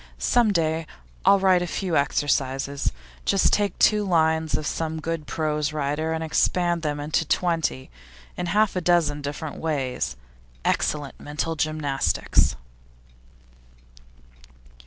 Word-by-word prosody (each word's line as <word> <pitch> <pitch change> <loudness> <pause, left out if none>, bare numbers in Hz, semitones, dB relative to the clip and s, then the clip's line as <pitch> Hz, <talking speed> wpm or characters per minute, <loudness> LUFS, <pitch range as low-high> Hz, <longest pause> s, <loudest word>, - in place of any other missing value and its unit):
Some 240 -3 +3
day 160 -3 0 0.4
I'll 200 +1 +7
write 190 -2 +4
a 175 - -2
few 180 0 -2
exercises; 140 -1 0 0.3
just 195 - +2
take 205 -3 +1
two 210 -1 +4
lines 160 -4 +2
of 155 - -5
some 160 +1 -2
good 160 0 -4
prose 150 -1 -1
writer, 150 +2 -1
and 160 0 -2
expand 175 +2 +1
them 150 -2 -2
into 150 +2 0
twenty, 165 - -1 0.4
in 175 - -3
half 210 +2 +2
a 185 - 0
dozen 165 -4 +2
different 145 +2 -5
ways. 130 - -2 0.5
Excellent 145 -3 -1
mental 150 +2 -3
gymnastics! 155 -3 +1
160 Hz, 120 wpm, -24 LUFS, 145-175 Hz, 0.5 s, I'll